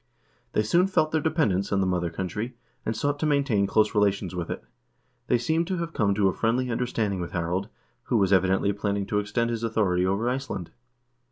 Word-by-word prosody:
They 105 - +2
soon 175 - +3
felt 155 -5 +1
their 160 - +1
dependence 145 - +1
on 100 - +2
the 95 - +2
mother 90 -2 0
country, 95 +8 -4 0.3
and 110 0 -1
sought 145 +3 0
to 155 - +1
maintain 140 -9 +2
close 105 +1 +2
relations 100 -3 +1
with 90 -2 -4
it. - - -4 0.6
They 125 - +3
seem 160 +8 +1
to 185 +1 -2
have 170 0 -4
come 100 -4 +1
to 100 -1 +3
a 95 - +1
friendly 120 +2 0
understanding 115 -5 -1
with 85 - -5
Harald, 85 +3 -1 0.4
who 120 - +1
was, 100 -2 +3
evidently, 95 +2 +3
planning 100 0 -1
to 105 +1 0
extend 115 +3 -1
his 115 -1 -3
authority 100 -6 +1
over 100 +5 0
Iceland. 125 -9 -3
105 Hz, 200 wpm, -26 LUFS, 95-125 Hz, 0.6 s, soon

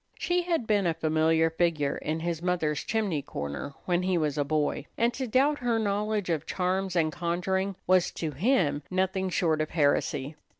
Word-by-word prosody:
She 355 0 +1
had 335 -8 -1
been 205 -4 +2
a 165 - +1
familiar 160 +1 +2
figure 160 -4 +1
in 155 +1 -3
his 170 -1 -2
mother's 170 -5 0
chimney 205 -9 -1
corner 70 - -5
when 175 -1 +1
he 185 -1 +1
was 150 -4 0
a 145 - +1
boy, 150 0 -1
and 235 +1 +2
to 260 +1 -3
doubt 275 +6 +2
her 240 -2 +1
knowledge 210 -2 0
of 160 -1 -2
charms 185 0 -1
and 160 -2 +2
conjuring 185 +4 -1
was 185 -1 +4
to 160 -2 -3
him 155 - +1
nothing 190 0 0
short 160 -3 +1
of 155 - -2
heresy. 145 -2 +1
175 Hz, 180 wpm, -28 LUFS, 155-200 Hz, -, was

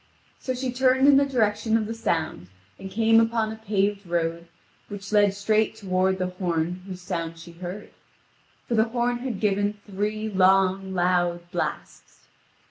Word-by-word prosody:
So 255 - -3
she 255 0 -2
turned 260 +2 +3
in 280 -1 +7
the 280 0 +3
direction 220 -3 +1
of 220 - -1
the 225 - -4
sound, 160 - -2 0.3
and 190 - -7
came 225 +2 +4
upon 225 -1 +1
a - - -6
paved 205 -2 -1
road 170 0 -2 0.4
which 205 0 -8
led 205 -2 +4
straight 215 +2 +1
toward 190 -2 0
the 185 - -1 0.2
horn 175 0 -1
whose 185 -2 -8
sound 165 -3 -4
she 165 +1 -11
heard; 180 +4 -8 0.8
for - - -2
the 220 -1 +4
horn 240 +1 -1
had 245 -5 -4
given 205 0 +1
three 210 +2 -3
long, 190 -1 +2
loud 175 -1 0
blasts. - - -5
205 Hz, 160 wpm, -25 LUFS, 180-225 Hz, 0.8 s, in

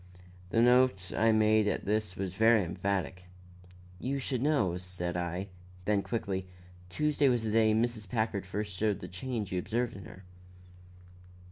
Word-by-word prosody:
The 115 +4 +3
note 125 -7 +3
I 115 0 +4
made 110 -1 +4
at - - -1
this 105 -2 -1
was 95 -2 -4
very 110 +1 +4
emphatic. 90 0 -3 0.7
"You 135 +6 -2
should 130 -2 -2
know," 120 - +1
said 90 -1 -5
I; 90 +3 -3 0.4
then 105 -1 +2
quickly 95 -4 -3 0.4
"Tuesday 150 +6 +2
was 120 -3 +1
the 110 - -1
day 110 -1 +4
Mrs. 110 -3 -1
Packard 110 -4 -1
first 100 +1 -4
showed 105 +1 0
the 90 - -7
change 105 +3 -4
you 90 - 0
observed 115 +5 -2
in 95 - -9
her." 95 - -12
105 Hz, 155 wpm, -30 LUFS, 95-115 Hz, 0.7 s, I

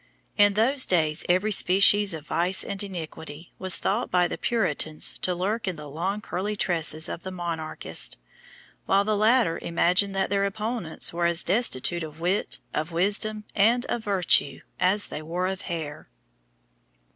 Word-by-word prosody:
In 205 -1 +4
those 255 +5 +3
days 155 -3 +2
every 185 +5 +2
species 200 +1 +5
of 155 -2 -10
vice 180 +4 +1
and 200 -1 -5
iniquity 165 -4 -8
was 185 -1 +2
thought 220 +6 -2
by 180 -1 +2
the - - -5
Puritans 155 -9 +1
to 180 - -1
lurk 200 +5 -2
in 185 - -2
the 150 -2 -10
long 185 +8 -3
curly 205 +1 -4
tresses 165 -5 +1
of - - -6
the 190 - -7
monarchists, 170 -3 -3 0.7
while 195 +1 +3
the 215 +1 0
latter 215 -4 +2
imagined 180 +4 +1
that 195 0 -1
their 200 0 +1
opponents 210 -5 -2
were 170 0 0
as 170 0 +3
destitute 175 - -1
of 155 -1 -8
wit, 180 +4 -1 0.2
of 155 +3 -3
wisdom, 205 +5 +1
and 235 +5 +2
of 235 - -3
virtue, 195 -4 +2 0.2
as 190 +3 +3
they 150 - -6
were 170 +4 -3
of 190 0 -3
hair. 160 -4 -6
185 Hz, 160 wpm, -25 LUFS, 170-205 Hz, 0.7 s, species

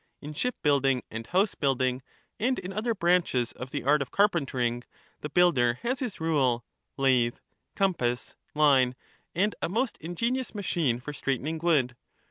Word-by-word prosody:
In 150 +1 -8
ship 250 +11 -1
building 135 -4 +2
and 115 +1 -6
house 190 +3 +2
building, 130 -2 0 0.4
and 255 +4 +1
in 185 +2 -6
other 225 +3 -1
branches 170 - +2
of 125 - -8
the - - -4
art 145 +3 +3
of 135 - -3
carpentering, 130 - +1 0.4
the 150 - -5
builder 135 -8 +3
has 255 +2 -1
his 245 -7 -4
rule, 135 -7 +1 0.3
lathe, 130 -3 +3 0.4
compass, 125 -11 0 0.2
line, 135 -4 +4 0.4
and 205 +5 +2
a - - -1
most 235 +6 -1
ingenious 230 +10 -2
machine 165 - 0
for 150 +4 -7
straightening 140 +3 -2
wood. 145 -8 +2
150 Hz, 150 wpm, -28 LUFS, 125-185 Hz, 0.4 s, line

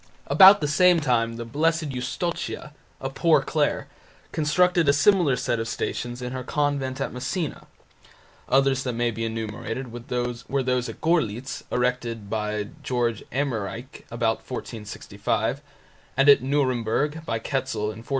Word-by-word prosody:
About 195 +1 +8
the 150 - +1
same 180 +3 +5
time 115 -5 +1
the 115 0 -6
Blessed 160 +5 0
Eustochia, 150 +4 -4 0.3
a 135 - -4
poor 165 +4 +4
Clare, 150 -2 0 0.4
constructed 170 +1 +3
a - - +6
similar 170 -3 +4
set 120 - -1
of 115 - -2
Stations 120 +2 -3
in 125 - -4
her 130 -1 -4
convent 140 -1 -1
at 135 - -3
Messina. 140 +6 -3 0.8
Others 135 0 +3
that 125 -2 -2
may 120 0 0
be 115 +1 -3
enumerated 115 +2 -4
were 120 - -6 0.6
those 125 0 0
at - - -9
Görlitz, 135 -7 0
erected 120 -4 -1
by 105 -1 -2
G. 120 -3 -1
Emmerich, 125 -2 -4
about 115 -1 0
1465, 110 +1 -4 0.6
and 135 +1 +4
at 140 -3 +8
Nuremburg, 135 +2 0
by 115 - -2
Ketzel, 110 -3 -2
in 110 - -10
1468. 115 - -18
130 Hz, 140 wpm, -25 LUFS, 115-145 Hz, 0.8 s, About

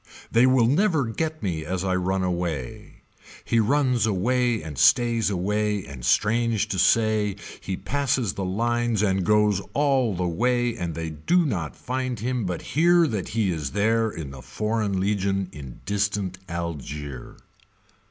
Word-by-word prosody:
They 120 +3 +5
will 130 -2 +4
never 155 - +2
get 155 +7 -3
me 85 -5 -2
as 90 +3 -3
I 95 -1 0
run 95 +1 0
away. 85 -8 -4 0.4
He 115 - +2
runs 125 0 +2
away 120 +2 +1
and 75 -2 -7
stays 115 - +3
away 105 +1 -1
and 70 -4 -10
strange 110 - +2
to 95 - -2
say 110 -1 +3 0.2
he 95 -2 -4
passes 125 -1 -1
the 100 - -4
lines 115 +3 0
and 95 -2 +1
goes 105 0 +3
all 135 -7 +2
the 90 0 -1
way 120 +6 +1
and 85 -5 -4
they 80 -1 -4
do 170 - +1
not 85 - -3
find 130 -2 -3
him 120 0 -2
but 90 -2 -4
hear 170 +3 +5
that 105 -6 -3
he 105 -4 +2
is 75 -5 -4
there 110 +2 +2
in 80 -8 -7
the 65 -1 -10
foreign 105 - -2
legion 95 -1 0
in 70 -7 -10
distant 100 -2 -1
Algier. 75 -6 -6
105 Hz, 155 wpm, -24 LUFS, 90-120 Hz, 0.4 s, They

